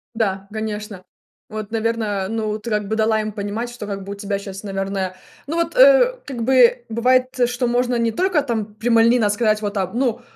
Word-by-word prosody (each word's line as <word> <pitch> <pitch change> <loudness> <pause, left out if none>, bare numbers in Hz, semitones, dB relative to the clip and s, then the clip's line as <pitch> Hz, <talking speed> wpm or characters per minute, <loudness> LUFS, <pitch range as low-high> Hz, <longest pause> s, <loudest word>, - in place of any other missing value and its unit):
Да, 195 -3 -1
конечно. 210 -3 -5 0.5
Вот, 215 -1 -6
наверно, 220 -4 -1
ну, 215 -1 -2
ты 225 +2 -7
как 210 -2 -1
бы 220 - 0
дала 220 0 +2
им 215 0 -4
понимать, 210 +3 -4
что 240 -4 -8
как 195 -1 -5
бы 200 - -8
у - - -8
тебя 200 0 -3
сейчас, 195 0 -8
наверное, 195 -2 -3 0.3
ну 315 - -3
вот, 335 +7 -1
э, - - +6
как 250 -5 -5
бы 250 -1 +4
бывает, 255 +3 +3 0.2
что 245 +1 -1
можно 245 +1 +1
не 230 -1 +1
только 365 - +1
там 220 -6 -3
прямолинейно 230 0 +3
сказать: 215 0 +1 0.3
"Ну 245 -1 0
220 Hz, 185 wpm, -21 LUFS, 205-245 Hz, 0.5 s, э